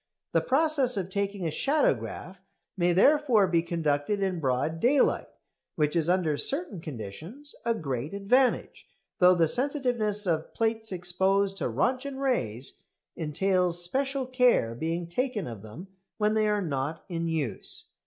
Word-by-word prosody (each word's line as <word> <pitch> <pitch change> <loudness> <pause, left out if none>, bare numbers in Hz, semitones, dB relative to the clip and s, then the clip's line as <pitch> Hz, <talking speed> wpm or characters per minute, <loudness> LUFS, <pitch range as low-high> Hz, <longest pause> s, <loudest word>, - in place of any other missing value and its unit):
The - - +3
process 275 -4 +2
of 190 -1 -3
taking 200 -1 -2
a 160 - 0
shadowgraph 185 - 0 0.4
may 175 -2 +2
therefore 250 - +4
be 170 -2 +2
conducted 165 +2 -1
in 185 -3 -1
broad 140 +3 -1
daylight, 260 - +3 0.5
which 150 0 0
is 165 -1 +1
under 175 -5 +2
certain 280 - +1
conditions 160 - -7
a 230 -1 +2
great 140 - -4
advantage, 250 +6 +1 0.3
though 180 0 +7
the 165 -2 +3
sensitiveness 245 - -1
of 165 -3 -1
plates 225 -1 -1
exposed 190 +2 0
to - - -3
Röntgen 265 +1 -1
rays 135 - -2 0.3
entails 175 +2 +1
special 270 +7 -1
care 250 - +3
being 165 +7 -3
taken 245 +3 -2
of 115 -5 -7
them 110 - -10 0.3
when 210 0 +2
they 215 -1 +2
are 210 -1 +1
not 145 0 -3
in 170 -2 -3
use. 150 -11 -3
190 Hz, 145 wpm, -28 LUFS, 160-245 Hz, 0.5 s, though